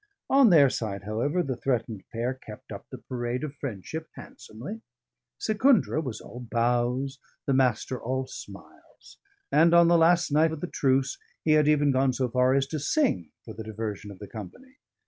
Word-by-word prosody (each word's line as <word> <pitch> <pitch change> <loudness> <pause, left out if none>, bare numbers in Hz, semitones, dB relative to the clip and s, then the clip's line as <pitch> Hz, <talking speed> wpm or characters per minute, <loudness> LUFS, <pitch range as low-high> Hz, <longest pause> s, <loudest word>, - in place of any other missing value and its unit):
On 270 -3 +7
their 150 -6 +7
side, 105 -6 -3
however, 120 - 0
the 130 -4 -3
threatened 115 -5 -2
pair 120 +3 -1
kept 110 -5 -12
up - - -8
the - - -8
parade 120 +1 -4
of 150 -2 -4
friendship 145 - -6
handsomely; 145 - -9 0.6
Secundra 220 - +3
was 125 -7 -5
all 120 - -10
bows, 120 +3 0 0.3
the 140 - +1
Master 130 -1 +1
all 130 +2 -2
smiles; - - -13 0.3
and 170 +1 +5
on 170 0 +7
the 170 -1 +5
last 170 0 +4
night 155 +2 +4
of 160 - -5
the - - -1
truce 135 -1 +1 0.2
he 155 - +2
had 155 -1 +5
even 145 -1 +4
gone 130 0 +2
so 130 +1 0
far 125 +2 +3
as 135 -1 +2
to 155 - -3
sing 150 - +1 0.2
for - - -8
the 110 - -7
diversion 110 -1 -5
of 100 - -10
the 105 - -9
company. 185 - -10
130 Hz, 180 wpm, -27 LUFS, 115-155 Hz, 0.6 s, On